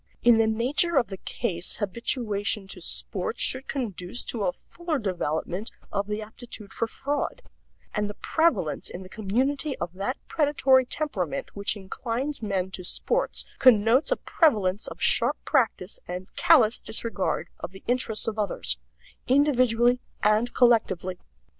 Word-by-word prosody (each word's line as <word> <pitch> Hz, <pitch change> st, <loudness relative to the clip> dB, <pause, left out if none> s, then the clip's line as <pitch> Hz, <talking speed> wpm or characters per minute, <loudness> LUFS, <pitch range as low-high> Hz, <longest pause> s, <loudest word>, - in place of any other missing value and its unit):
In 235 Hz, -1 st, +6 dB
the 225 Hz, -, +4 dB
nature 265 Hz, +9 st, +2 dB
of 245 Hz, -, +3 dB
the 195 Hz, -, -6 dB
case 180 Hz, -6 st, -3 dB
habituation 205 Hz, -1 st, -1 dB
to 180 Hz, -, -7 dB
sports 190 Hz, +5 st, -3 dB
should 260 Hz, +1 st, +1 dB
conduce 220 Hz, -5 st, -3 dB
to 220 Hz, -4 st, -2 dB
a -, -, +2 dB
fuller 340 Hz, +3 st, -4 dB
development 180 Hz, -, -2 dB, 0.2 s
of 200 Hz, 0 st, -1 dB
the 210 Hz, +1 st, -3 dB
aptitude 220 Hz, -2 st, -10 dB
for 230 Hz, -, -1 dB
fraud; 290 Hz, -, -3 dB, 0.5 s
and 210 Hz, -1 st, -1 dB
the 205 Hz, -, -7 dB
prevalence 320 Hz, -, +1 dB
in 185 Hz, -, -7 dB
the 185 Hz, -, -12 dB
community 260 Hz, +8 st, -1 dB
of 175 Hz, -, -4 dB
that 200 Hz, +8 st, -2 dB
predatory 275 Hz, -4 st, +3 dB
temperament 245 Hz, -, -3 dB
which 200 Hz, +1 st, -1 dB
inclines 235 Hz, +8 st, -4 dB
men 190 Hz, -3 st, -1 dB
to 185 Hz, -, -6 dB
sports 485 Hz, -, 0 dB
connotes 245 Hz, -, +5 dB
a -, -, +3 dB
prevalence 210 Hz, -, +2 dB
of -, -, -8 dB
sharp -, -, +2 dB
practice 225 Hz, -, +1 dB
and 180 Hz, +1 st, -7 dB
callous 280 Hz, -10 st, +5 dB
disregard 200 Hz, -7 st, -2 dB
of -, -, -5 dB
the 190 Hz, +1 st, -14 dB
interests 240 Hz, -3 st, 0 dB
of 220 Hz, -1 st, -2 dB
others, 205 Hz, -, -1 dB, 0.5 s
individually 250 Hz, -3 st, +4 dB, 0.2 s
and 215 Hz, +3 st, +3 dB
collectively. 190 Hz, -7 st, +3 dB
225 Hz, 145 wpm, -26 LUFS, 195-260 Hz, 0.5 s, In